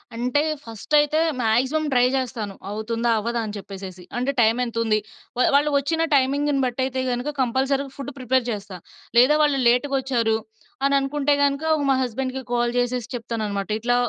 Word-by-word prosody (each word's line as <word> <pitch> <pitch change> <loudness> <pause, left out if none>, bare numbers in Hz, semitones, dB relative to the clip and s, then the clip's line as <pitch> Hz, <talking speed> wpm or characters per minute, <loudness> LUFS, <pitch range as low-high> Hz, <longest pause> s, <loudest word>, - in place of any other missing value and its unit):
అంటే 250 +5 +1 0.2
ఫస్ట్ 225 +5 -9
అయితే 295 +1 +2 0.2
maximum 255 +7 +1
try 245 -1 +5
జేస్తాను 235 -6 -2 0.2
అవుతుందా? 230 +3 -2
అవ్వదా? 235 +2 -2
అని 210 - -6
చెప్పేసేసి. 190 -2 -9
అంటే 255 +3 0
టైమ్ 225 +2 +4
ఎంత 235 -1 -5
ఉంది? 215 -1 +2 0.4
వ - - -2 0.2
వాళ్ళు 295 +1 +3
ఒచ్చిన 320 +4 -1
టైమింగ్‌న్ని 280 +1 +2
బటయితే 260 +1 -1
గనక 245 +5 -2
కంపల్సరీగా 270 +2 0
ఫుడ్ 280 0 -6
ప్రిపేర్ 255 -1 +1
జేస్తా. 200 -3 -5 0.4
లేదా 260 +5 +6
వాళ్ళు 290 -2 +3
లేట్‌గొచ్చారు 250 -3 +1 0.5
అని 280 - +2
అనుకుంటే 285 +1 0
గనుక 280 +2 +1 0.3
మా 270 - +4
హస్బెండ్‌కి 260 +2 -3
కాల్ 240 0 +1
జేసేసి 245 -1 -1
చెప్తాను 230 -1 -4
అనమాట 200 0 -3
"ఇట్లా 245 +2 +1
250 Hz, 160 wpm, -23 LUFS, 230-275 Hz, 0.5 s, లేదా